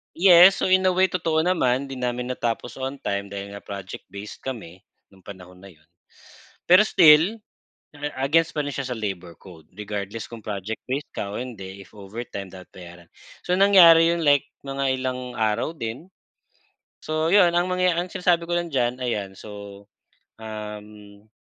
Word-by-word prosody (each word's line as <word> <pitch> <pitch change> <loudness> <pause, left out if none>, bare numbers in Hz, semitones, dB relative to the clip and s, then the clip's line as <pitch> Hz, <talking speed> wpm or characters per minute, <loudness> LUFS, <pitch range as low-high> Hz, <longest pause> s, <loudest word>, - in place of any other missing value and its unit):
Yes, 180 +1 +7
so - - +1
in 185 0 +4
a 185 - +3
way, 185 +1 +3
totoo 160 -3 0
naman, 140 -6 0
'di 135 - -7
namin 125 0 -3
natapos 120 -1 -3
on 135 +1 -5
time 100 0 -3
dahil 100 0 -6
nga 100 - -8
project-based 100 +1 -9
kami 100 -9 -8 0.2
nung 95 -2 -22
panahon 90 -2 -12
na 95 0 -14
yun. 80 -1 -29 0.8
Pero 180 +3 +8
still 175 +4 +5 0.8
against 160 +5 +2
pa 150 -1 -1
rin 145 - -4
siya 135 -1 -4
sa 125 - -4
labor 95 -5 -6
code 80 -5 -16
regardless 105 +1 -5
kung 115 -1 -10
project-based 110 +7 -5
ka 100 - -4
o - - -4
hindi 100 -6 -8
if - - -24
overtime 100 -1 -7
dapat 95 -1 -12
bayaran. 85 -1 -13 0.4
So 180 0 +1
nangyari 170 -4 +7
yun, 170 - -3
like 145 -1 +4 0.2
mga 135 -1 -2
ilang 125 -1 -4
araw 110 +7 0
din. 115 +8 -6 1.0
So 155 +1 -1
'yun 180 -2 +5
ang 175 +1 +1
mangyaya 180 -1 +1
ang 180 - -6
sinasabi 175 -2 +1
ko - - -1
lang 175 0 -3
diyan 125 -1 0
ayan 105 -5 -2
so, 100 -1 -11 0.5
uhm, 105 -1 -10
125 Hz, 165 wpm, -23 LUFS, 100-165 Hz, 1.0 s, Pero